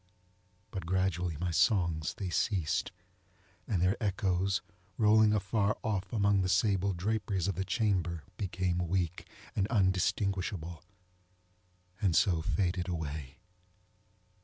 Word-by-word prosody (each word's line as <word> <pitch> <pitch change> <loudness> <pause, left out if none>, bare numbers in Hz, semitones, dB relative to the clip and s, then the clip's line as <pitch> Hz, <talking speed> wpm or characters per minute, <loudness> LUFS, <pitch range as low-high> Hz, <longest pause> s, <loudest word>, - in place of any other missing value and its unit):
But 95 -3 -5
gradually 90 -3 0
my 90 0 -1
songs 85 -4 +2
they 100 -5 -4
ceased, 90 -2 0 0.8
and 95 -6 +1
their 95 +3 +3
echoes, 95 -2 0 0.3
rolling 110 0 +5
afar 105 0 +1
off 95 -5 -2
among 100 -3 +3
the 90 - 0
sable 100 0 +2
draperies 100 0 -1
of 100 - +1
the 95 +3 -2
chamber, 95 -5 0
became 95 -2 -1
weak, 90 -1 -2 0.3
and 100 -2 +1
undistinguishable, 95 -4 0 1.2
and 95 -6 +2
so 85 -3 +3
faded 90 +1 0
away. 75 -3 -5
95 Hz, 110 wpm, -31 LUFS, 85-100 Hz, 1.2 s, rolling